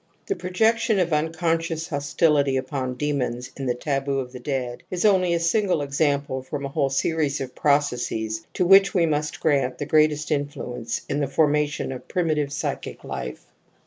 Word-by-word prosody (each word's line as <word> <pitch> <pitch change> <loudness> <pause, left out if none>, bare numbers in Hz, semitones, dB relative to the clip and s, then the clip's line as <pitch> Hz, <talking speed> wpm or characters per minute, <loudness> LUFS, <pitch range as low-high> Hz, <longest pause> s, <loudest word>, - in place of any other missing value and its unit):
The 395 - -1
projection 220 - +1
of 175 -3 +1
unconscious 165 +1 0
hostility 145 -2 +2
upon 130 -1 -3
demons 125 -4 -2
in 135 -1 -4
the 125 - +1
taboo 135 +1 -1
of 130 -2 -3
the 125 - -8
dead 125 -2 -3
is 180 +2 -1
only 185 -4 +4
a - - +1
single 175 -1 +1
example 140 -1 0
from 140 +2 -5
a - - -3
whole 135 0 0
series 145 +1 0
of 130 -2 -5
processes 120 -6 0
to 180 - +2
which 195 +1 +6
we 175 -3 +4
must 150 -1 -1
grant 140 -5 +1
the 145 - -3
greatest 150 0 +2
influence 130 -5 -3
in 145 - -1
the 140 - 0
form 150 +2 +3
ation 150 -2 -1
of 130 - -8
primitive 155 -5 0
psychic - - -4
life. 60 0 -6
145 Hz, 175 wpm, -24 LUFS, 135-165 Hz, -, which